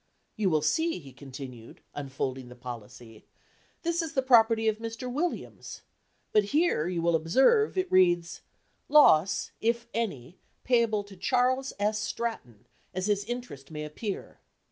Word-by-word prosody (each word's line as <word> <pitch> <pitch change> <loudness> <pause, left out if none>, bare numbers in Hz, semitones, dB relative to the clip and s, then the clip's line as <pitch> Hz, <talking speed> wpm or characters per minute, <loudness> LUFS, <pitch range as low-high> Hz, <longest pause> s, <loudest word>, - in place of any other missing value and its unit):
You 210 -4 +1
will 155 -3 +1
see," 325 - +1
he 140 -6 -12
continued, 130 -3 -10
unfolding 130 -2 -4
the 125 - -11
policy, 120 -2 -10 0.6
"this 340 0 0
is 325 -1 -5
the 265 - +1
property 225 -3 +5
of 215 0 +1
Mr. 230 +2 -5
Williams, 340 +6 -4 0.5
but 210 -1 +4
here, 290 - +1
you 175 -2 -2
will 170 -1 +3
observe, 265 - +3
it 370 0 -1
reads 175 -2 +3 0.5
'loss, 195 - +5
if 235 +1 0
any, 185 - -4 0.2
payable 230 -4 +2
to 200 -1 -14
Charles 255 +6 +1
S. 210 +1 0
Stratton, 210 - -4 0.3
as 185 0 -1
his 205 -1 +1
interest 240 - -6
may 150 -1 -5
appear. 195 +7 -6
205 Hz, 145 wpm, -28 LUFS, 150-245 Hz, 0.6 s, property